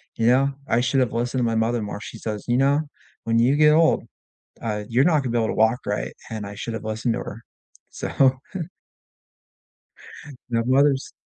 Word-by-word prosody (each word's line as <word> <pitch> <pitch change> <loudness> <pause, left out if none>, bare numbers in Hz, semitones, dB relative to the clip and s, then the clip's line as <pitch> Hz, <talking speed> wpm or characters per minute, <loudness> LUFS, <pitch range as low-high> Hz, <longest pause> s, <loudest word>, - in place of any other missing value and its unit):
you 115 - +1
know, 135 +3 +4 0.2
I 115 - +3
should've 130 -1 +1
listened 120 +2 -1
to - - +1
my 115 - 0
mother 115 +1 +1
more, 105 0 -5
she - - -8
says, 105 -2 -5
"You 120 0 +2
know, 140 +3 +3 0.4
when 115 0 +2
you 125 +4 +4
get 150 0 +6
old, 160 -5 +3 0.6
uh, 105 -2 -3
you're 125 +4 +3
not 155 -4 +3
gonna 125 - -2
be 120 - 0
able 110 - +1
to - - -2
walk 110 +3 +3
right," - - -3 0.2
and 110 -2 -4
I 100 - -8
should've 110 +1 -5
listened 110 +2 -1
to - - -3
her. 110 - -8 0.5
So 135 -1 +2 2.2
you 115 - 0
know, 115 - +1
mothers 135 +1 +2
120 Hz, 190 wpm, -23 LUFS, 110-135 Hz, 2.2 s, get